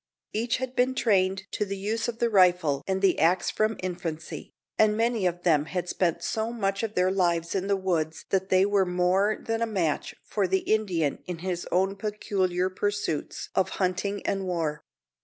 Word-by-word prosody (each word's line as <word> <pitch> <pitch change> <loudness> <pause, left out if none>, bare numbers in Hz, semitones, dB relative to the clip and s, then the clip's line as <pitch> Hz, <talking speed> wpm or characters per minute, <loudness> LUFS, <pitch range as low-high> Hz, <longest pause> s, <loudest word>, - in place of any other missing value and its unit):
Each 235 +3 0
had 260 0 -5
been 255 +1 +2
trained 190 -5 +2
to - - -1
the 200 -1 -4
use 215 +4 -2
of 235 -1 -3
the 235 -1 +1
rifle 180 -7 +4
and 190 0 -1
the 190 -2 +4
axe 170 +4 +3
from 215 +1 0
infancy, 170 -3 -5 0.3
and 215 -1 +4
many 230 -4 +1
of 175 0 -3
them 155 -4 +3
had 180 +1 -3
spent 170 -2 0
so 220 +5 -1
much 200 -4 -1
of 220 -2 -3
their 180 +1 +3
lives 170 -3 +1
in 195 0 -1
the 200 - +3
woods 165 -5 -1
that 190 0 +1
they 185 +1 +5
were 200 -1 +3
more 185 +3 +2
than 225 0 -2
a 230 - +1
match 175 -9 -1
for 200 -3 0
the 190 +1 +1
Indian 180 -9 0
in 180 -2 -4
his 175 -2 -2
own 190 +2 +2
peculiar 195 -3 -1
pursuits 205 -5 -2
of 190 - +2
hunting 195 +2 -1
and 195 -1 -1
war. 165 -4 -2
190 Hz, 190 wpm, -27 LUFS, 180-210 Hz, 0.3 s, they